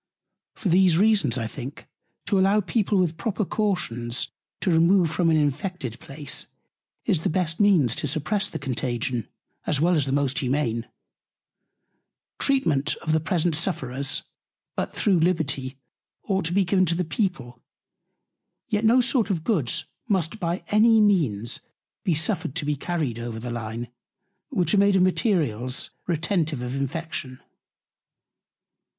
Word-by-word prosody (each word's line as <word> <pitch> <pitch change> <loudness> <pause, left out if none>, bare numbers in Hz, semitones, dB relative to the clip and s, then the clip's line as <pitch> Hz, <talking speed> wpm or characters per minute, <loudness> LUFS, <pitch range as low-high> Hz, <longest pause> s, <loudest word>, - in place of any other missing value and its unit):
For 195 - -2
these 180 -1 +5
Reasons, 200 - +3
I 115 - -2
think, 125 +5 -7 0.4
to 200 +1 +2
allow 195 +3 +4
People 205 +2 0
with 170 -3 +1
proper 215 0 -1
Cautions 130 - -1 0.3
to 190 - +1
remove 170 +1 +4
from 170 0 +2
an 160 - +4
infected 145 - -2
Place, 140 0 -4 0.6
is 175 - +2
the - - 0
best 165 -1 -1
Means 175 - +4
to - - 0
suppress 160 +8 0
the - - -5
Contagion, 125 -3 -2 0.4
as 145 - +1
well 175 +4 +3
as 150 -5 +2
the - - -1
most 140 -1 +1
humane 125 -4 -1 1.5
Treatment 160 - +1
of 160 - -1
the 160 - +3
present 165 0 0
Sufferers: 140 -6 -1 0.5
But - - -3
though 210 - +2
Liberty 160 -7 +1 0.5
ought 195 -3 -1
to 165 - 0
be 195 0 +3
given 185 0 +3
to 170 - +2
the 180 +1 -1
People, 135 - -3 1.1
yet 210 +1 0
no 235 +3 +5
sort 240 -3 +1
of 170 -5 -1
Goods 160 - +1 0.2
must 190 -1 0
by 170 +1 -2
any 220 +2 +5
means 145 - +2 0.4
be 175 - +1
suffered 160 -2 -1
to 165 - -1
be 150 0 0
carried 145 -6 -2
over 115 -1 -5
the 120 +1 -5
Line, 115 0 -4 0.6
which 185 - 0
are 205 - +5
made 200 0 +4
of 185 - +5
Materials 150 - 0 0.2
retentive 165 - 0
of 125 +1 -3
Infection. 140 -2 -4
165 Hz, 145 wpm, -25 LUFS, 135-190 Hz, 1.5 s, these